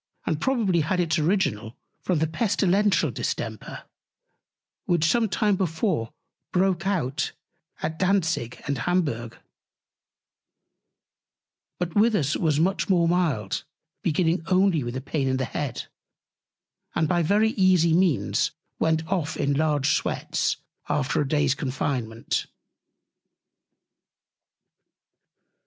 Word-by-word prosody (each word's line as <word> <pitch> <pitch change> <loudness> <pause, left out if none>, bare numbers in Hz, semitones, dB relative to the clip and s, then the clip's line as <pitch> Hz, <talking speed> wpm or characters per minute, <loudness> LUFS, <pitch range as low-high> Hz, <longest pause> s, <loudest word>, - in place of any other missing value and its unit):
and 155 -2 -1
probably 225 -10 +2
had 165 +4 0
its 165 -2 +1
Original 150 - 0 0.2
from 180 - 0
the 155 - +2
Pestilential 190 - +2
Distemper, 110 -2 -4 1.0
which 170 -3 +2
some 225 +6 +2
time 205 +1 +2
before 165 - -1 0.4
broke 185 0 +1
out 150 -7 -1 0.5
at 160 0 -3
Dantzick 170 - 0
and 140 -2 -1
Hamburgh: 130 -8 -1 2.4
But 175 -2 -3
with 220 +2 +4
us 150 -6 +1
was 155 -4 +1
much 190 +5 +1
more 175 -3 +4
mild, 160 - 0 0.4
beginning 170 -1 +1
only 185 -5 +3
with 120 +1 -5
a 130 - -3
Pain 140 0 -2
in 130 0 +1
the 130 - -1
Head, 125 0 -4 1.1
and 160 - +2
by 175 +2 +2
very 210 +6 +3
easy 185 -5 +3
Means 175 -4 +2 0.3
went 160 0 +1
off 160 -4 -1
in 140 - +1
large 145 -1 +2
Sweats, - - -1 0.3
after 145 +1 +1
a 145 - -1
Day's 145 -2 +2
Confinement. 130 -4 -2
160 Hz, 110 wpm, -25 LUFS, 140-185 Hz, 2.4 s, with